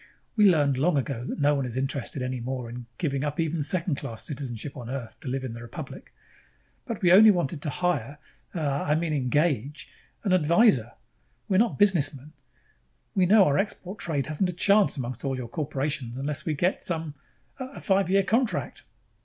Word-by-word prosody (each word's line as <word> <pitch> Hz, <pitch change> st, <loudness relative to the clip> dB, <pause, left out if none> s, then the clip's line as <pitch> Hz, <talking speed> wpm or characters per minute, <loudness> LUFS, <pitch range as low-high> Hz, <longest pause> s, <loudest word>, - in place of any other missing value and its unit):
"We 210 Hz, -2 st, +5 dB
learned 145 Hz, -6 st, +3 dB
long 150 Hz, +3 st, +2 dB
ago 130 Hz, -3 st, -2 dB
that -, -, -4 dB
no 145 Hz, 0 st, +3 dB
one 140 Hz, -2 st, 0 dB
is 125 Hz, -1 st, -5 dB
interested 135 Hz, 0 st, -3 dB
any 130 Hz, 0 st, -3 dB
more 125 Hz, -1 st, -4 dB
in 120 Hz, 0 st, -8 dB
giving 140 Hz, -5 st, -1 dB
up 150 Hz, +1 st, -3 dB
even 160 Hz, -1 st, 0 dB
second 170 Hz, 0 st, 0 dB
class 115 Hz, -4 st, -6 dB
citizenship 135 Hz, -2 st, -5 dB
on 120 Hz, -4 st, -8 dB
Earth 125 Hz, -4 st, -6 dB
to -, -, -10 dB
live 130 Hz, +1 st, -2 dB
in 125 Hz, -3 st, -5 dB
the 115 Hz, -, -8 dB
Republic. 135 Hz, +4 st, -9 dB, 0.8 s
But 225 Hz, -4 st, -5 dB
we 175 Hz, -, +5 dB
only 215 Hz, +4 st, +9 dB
wanted 170 Hz, -6 st, +1 dB
to 150 Hz, -, -2 dB
hire 150 Hz, -5 st, -1 dB, 0.4 s
uh, 165 Hz, -, -2 dB, 0.2 s
I 150 Hz, -, +1 dB
mean 160 Hz, -1 st, -1 dB
engage 145 Hz, +1 st, 0 dB, 0.3 s
an, 195 Hz, -4 st, +1 dB
an 185 Hz, -, +4 dB
advisor. 155 Hz, -, +4 dB, 0.5 s
We're 190 Hz, -1 st, +3 dB
not 235 Hz, 0 st, +2 dB
businessmen. 150 Hz, -8 st, +1 dB, 0.8 s
We 190 Hz, -4 st, +3 dB
know 205 Hz, 0 st, +7 dB
our 140 Hz, -, +2 dB
export 195 Hz, -1 st, -4 dB
trade 145 Hz, -5 st, -1 dB
hasn't 155 Hz, +5 st, 0 dB
a -, -, -2 dB
chance 200 Hz, +1 st, +3 dB
among 125 Hz, -2 st, -4 dB
all 135 Hz, -2 st, -1 dB
your 125 Hz, -2 st, -5 dB
corporations 140 Hz, -2 st, -3 dB
unless 140 Hz, +3 st, -3 dB
we 155 Hz, -, 0 dB
get 180 Hz, +6 st, 0 dB
some 160 Hz, -3 st, -2 dB, 0.5 s
a 260 Hz, +1 st, -7 dB
five 195 Hz, -3 st, +1 dB
year 195 Hz, +1 st, +4 dB
contract...?" 230 Hz, +4 st, 0 dB
150 Hz, 190 wpm, -26 LUFS, 130-180 Hz, 0.8 s, only